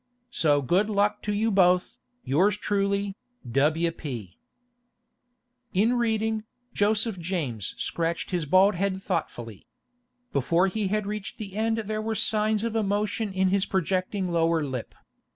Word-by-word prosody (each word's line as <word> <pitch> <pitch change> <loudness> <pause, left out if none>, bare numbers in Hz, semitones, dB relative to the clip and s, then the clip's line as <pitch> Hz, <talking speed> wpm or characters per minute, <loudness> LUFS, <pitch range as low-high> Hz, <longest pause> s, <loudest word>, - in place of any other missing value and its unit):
So 145 - +2
good 185 +11 +2
luck 210 0 +1
to 210 - -2
you 220 +2 +1
both, 180 -2 +5 0.4
from - - -7
yours 195 +9 +3
truly, 200 -1 0 0.4
W. 155 +6 +2
P.' 120 - -7 1.4
In 220 +6 +3
reading, 220 -2 0 0.3
Joseph 210 -1 +1
James 155 - -3
scratched 170 +2 -2
his 175 -4 -1
bald 190 +6 +5
head 190 +1 -1
thoughtfully. 120 - -4 0.7
Before 165 +7 +2
he 200 +1 -1
had 210 +1 0
reached 210 -1 -5
the 200 -3 -7
end 225 +1 +1
there 215 +1 -2
were 220 0 -2
signs 215 0 +1
of 230 -1 -2
emotion 210 0 0
in 190 0 +2
his 195 0 +1
projecting 185 0 -1
lower 165 -1 +2
lip. 130 -5 -5
195 Hz, 140 wpm, -26 LUFS, 170-210 Hz, 1.4 s, both